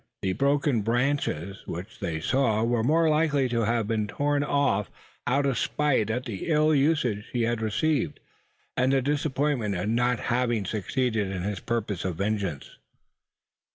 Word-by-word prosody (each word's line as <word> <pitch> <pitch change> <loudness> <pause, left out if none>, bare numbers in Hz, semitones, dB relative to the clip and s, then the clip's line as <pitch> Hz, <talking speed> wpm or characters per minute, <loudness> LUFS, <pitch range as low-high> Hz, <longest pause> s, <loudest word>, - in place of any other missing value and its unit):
The 95 -1 +1
broken 140 -1 +2
branches 115 - -1
which 90 +6 -7
they 80 -2 -2
saw 115 +2 +1
were 120 0 +1
more 160 +6 +3
likely 150 -3 +2
to 115 -2 +1
have 115 -1 0
been 110 -2 0
torn 145 +5 0
off 140 -9 +1 0.4
out 140 +3 +2
of 135 -5 +1
spite 140 -8 +1
at 125 +3 -2
the 105 -6 -5
ill 155 -1 +3
usage 135 -8 +1
he 120 -2 +1
had 115 0 0
received, 140 +8 0 0.6
and 130 +1 +2
the 135 -1 +2
disappointment 140 -6 0
at 90 +4 -2
not 120 +1 +2
having 120 -4 0
succeeded 110 +1 -1
in 95 -2 -4
his 100 -1 -2
purposes 110 -5 -2
of 90 -3 -1
vengeance. 100 -5 -3
120 Hz, 155 wpm, -26 LUFS, 105-140 Hz, 0.6 s, more